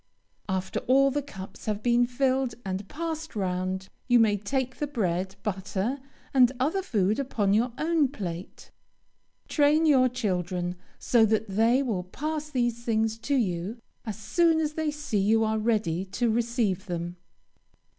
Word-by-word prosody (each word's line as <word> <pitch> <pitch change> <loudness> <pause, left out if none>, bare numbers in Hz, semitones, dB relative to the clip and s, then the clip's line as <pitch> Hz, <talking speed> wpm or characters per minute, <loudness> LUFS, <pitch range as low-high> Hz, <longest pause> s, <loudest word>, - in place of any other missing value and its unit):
After 190 0 -1
all 275 +2 +5
the 290 +2 0
cups 195 -9 -10
have 210 0 -2
been 240 0 +3
filled 260 -1 0
and 190 +1 -3
passed 320 -1 -5
round, 185 -1 -2 0.2
you 245 -2 +5
may 220 -3 +4
take 255 +5 -2
the 295 - -2
bread, 190 -7 -1
butter, 205 +5 -2 0.3
and 255 -2 +6
other 315 +9 +1
food 210 - +1
upon 215 -7 0
your 235 +4 +2
own 320 -2 +2
plate. 185 -9 -7 0.8
Train 300 +2 +3
your 260 -4 +5
children, 180 -6 -2 0.2
so 235 -2 +3
that 220 0 0
they 230 +7 +3
will 210 -8 -1
pass 305 - -4
these 240 -4 -1
things 225 -1 0
to 280 +5 -1
you 195 -2 -1 0.3
as 215 -3 -5
soon 320 - +2
as 305 -1 -1
they 315 0 -1
see 295 -8 -2
you 220 +3 +3
are 220 0 +1
ready 210 -6 0
to 225 +5 0
receive 225 -4 0
them. 175 0 -4
225 Hz, 155 wpm, -27 LUFS, 195-270 Hz, 0.8 s, and